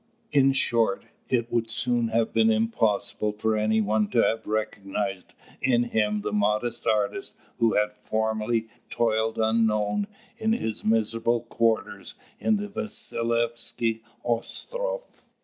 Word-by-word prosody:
In 135 -2 +5
short, 115 -6 +2 0.2
it 120 -2 0
would 115 -1 0
soon 120 0 +1
have 115 0 0
been 115 0 +4
impossible 110 -1 0
for 110 +1 0
any 110 +1 +2
one 105 0 +1
to 115 - +3
have 110 0 0
recognised 100 -3 -3 0.3
in 120 -2 +3
him 105 -3 0
the 105 0 -3
modest 105 +3 0
artist 105 -1 0 0.2
who 115 -1 +3
had 105 0 +2
formerly 110 +1 0 0.2
toiled 110 -1 +1
unknown 110 - +1 0.3
in 220 0 +1
his 110 - -2
miserable 115 +1 +1
quarters 115 -1 -1 0.2
in 220 -1 +2
the 205 0 -4
Vasilievsky 120 - 0 0.2
Ostroff. - - -3
115 Hz, 125 wpm, -26 LUFS, 110-120 Hz, 0.3 s, In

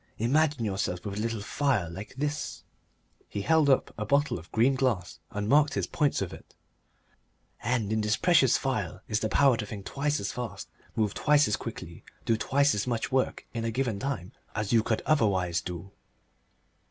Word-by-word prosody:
Imagine 140 +2 +2
yourself 95 -3 -2
with 100 0 -4
a - - -1
little 115 -1 -2
phial 105 - 0
like 95 +8 -8
this" 145 +1 -3 0.7
he 100 - -4
held 155 +4 +4
up 135 - +3
a - - -10
little - - -1
bottle 145 - -1
of 85 - -16
green 120 +5 +3
glass 115 -11 -1
and 105 0 -3
marked 145 +4 +4
his - - 0
points 150 -3 0
with - - -3
it - - -14 1.1
"and 115 -3 0
in 110 - +1
this 105 +1 +1
precious 160 -9 +4
phial 105 -9 -2
is 105 -1 0
the 110 - -1
power 135 -2 +4
to 110 - -3
think 100 -3 -7
twice 145 +4 -1
as 100 - -3
fast, 115 -5 -6 0.3
move 105 -2 +1
twice 150 0 +4
as 105 - +1
quickly, - - -8 0.2
do 115 - +3
twice 140 +5 +2
as 105 +3 -2
much 120 0 -1
work 130 0 0
in 115 -1 -3
a 115 - 0
given 115 -3 -1
time 115 -8 -3 0.2
as 105 +1 -1
you 115 - +6
could 110 0 -1
otherwise 95 - +2
do." 90 +2 -7
115 Hz, 190 wpm, -28 LUFS, 100-135 Hz, 1.1 s, you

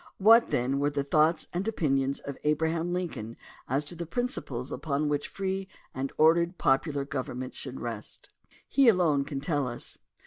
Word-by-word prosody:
What, 225 +4 +6
then, 130 +3 0
were 145 +1 +2
the 140 -1 -1
thoughts 155 +3 +2
and 180 +4 -2
opinions 140 -9 0
of 140 - -6
Abraham 160 +3 +1
Lincoln 165 -11 -4 0.3
as 140 +4 0
to 150 - -6
the 170 0 -5
principles 150 - -3
upon 150 -1 -1
which 145 -1 -1
free 195 0 -3 0.3
and 135 +1 -3
ordered 170 +3 +4
popular 140 +1 +1
government 130 -3 -4
should 130 - -7
rest? 115 -3 -7 0.4
He 275 -2 +4
alone 165 -10 +4
can 140 -1 -4
tell 145 -3 0
us. 120 -1 -6
150 Hz, 165 wpm, -28 LUFS, 135-175 Hz, 0.4 s, What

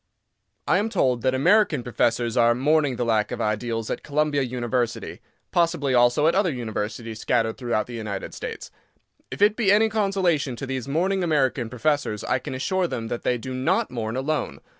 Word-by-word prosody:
I - - +3
AM 215 +2 -1
told 130 - +1
that 130 +2 +1
American 170 - +3
professors 120 0 0
are 120 -1 +4
"mourning 145 +1 +2
the 120 - -2
lack 110 -2 +1
of 125 - -4
ideals" 115 +1 -2
at - - -3
Columbia 150 -1 0
University—possibly 130 +5 -2
also 120 +4 +4
at 165 - +4
other 190 -2 +2
universities 110 -2 -4
scattered 115 -2 0
through 120 -2 -2
the 120 - -11
United 105 -4 -5
States. - - -7 0.6
If - - -1
it 210 +1 +5
be 215 -5 +2
any 220 +2 +4
consolation 190 - 0
to 135 - -6
these 130 -2 -4
mourning 185 +6 0
American 135 -7 +1
professors, 125 -3 -1
I 130 - 0
can 130 - -6
assure 185 +7 0
them 115 -7 -4
that 120 - -3
they 125 - 0
do 130 +2 -6
not 130 +1 0
mourn 115 -2 -3
alone. 150 +4 -2
130 Hz, 180 wpm, -24 LUFS, 120-155 Hz, 0.6 s, it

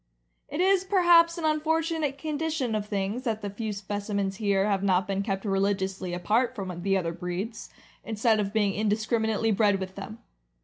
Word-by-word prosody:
It 295 +5 -2
is 380 0 +4
perhaps 345 -3 +5
an 330 - -3
unfortunate 315 -1 0
condition 305 -4 -2
of 210 -1 -2
things 200 +3 -2
that 220 -3 -2
the 205 - -3
few 215 +1 -4
specimens 200 -1 -3
here 200 -2 +1
have 200 -2 +1
not 190 -2 +2
been 195 0 -1
kept 195 0 -3
religiously 195 -2 -1
apart 220 +8 +1
from 185 -5 -5
the 195 +1 +2
other 170 -3 -1
breeds, 180 +6 -5 0.3
instead 220 0 +1
of 200 -1 -1
being 205 -2 +1
indiscriminately 220 +1 0
bred 205 -1 +3
with 190 0 -5
them. 200 +3 -8
210 Hz, 170 wpm, -27 LUFS, 195-255 Hz, 0.3 s, perhaps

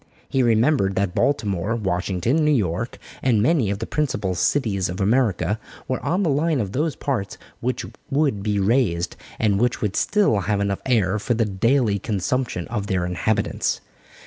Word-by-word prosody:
He 135 - +1
remembered 115 -3 +3
that 95 -2 0
Baltimore, 105 -6 0
Washington, 95 - 0
New 150 - +3
York, 110 - 0 0.2
and 120 -5 +3
many 125 -2 +2
of 100 - -1
the 115 - -4
principal 110 -12 -1
cities 100 -1 +1
of 90 - -5
America 105 -2 +1 0.3
were 130 - -1
on 185 +4 +1
the 170 - +1
line 150 +1 +1
of 100 -5 -2
those 150 +6 -1
parts 115 -10 -3 0.2
which 125 +2 -2 0.2
would 140 -7 +1
be 105 0 0
raised, 95 -5 +1 0.2
and 105 -2 +2
which 120 -1 +1
would 105 -3 -2
still 200 - +2
have 100 +2 0
enough 100 -1 -1
air 110 -5 +2
for 120 +4 0
the 115 0 +2
daily 105 +2 +1
consumption 105 -1 -2
of 105 -4 -3
their 90 -2 0
inhabitants. 90 +5 0
110 Hz, 170 wpm, -23 LUFS, 95-130 Hz, 0.3 s, remembered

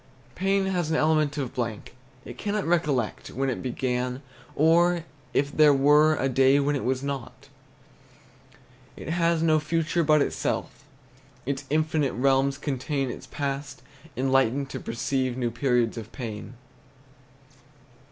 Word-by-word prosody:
Pain 195 +3 +1
has 180 -4 -1
an 160 - +1
element 155 -1 +2
of 135 -4 -3
blank; 115 -3 -4 0.3
It - - -8
cannot 210 -1 -2
recollect 150 -9 0
When 135 +1 -1
it - - -4
began, 125 +1 -2 0.3
or 170 +2 +3 0.3
if 140 +1 0
there 150 -2 +6
were 150 +3 +5
A 135 - 0
day 135 +2 +4
when 145 +1 +1
it 140 - -3
was 130 +1 -1
not. 140 -3 -6 1.5
It - - -7
has 170 -1 +1
no 155 -1 +4
future 165 +2 0
but 150 -1 +4
itself, - - -3 0.6
Its 135 0 -3
infinite 155 -2 +1
realms 135 +1 +2
contain 135 -1 -2
Its - - -9
past, 140 -2 -4 0.3
enlightened 135 +1 +1
to - - -5
perceive 130 +2 -2
New 120 -2 -1
periods 120 -1 0
of 110 0 -10
pain. 115 -2 -7
140 Hz, 135 wpm, -26 LUFS, 130-155 Hz, 1.5 s, there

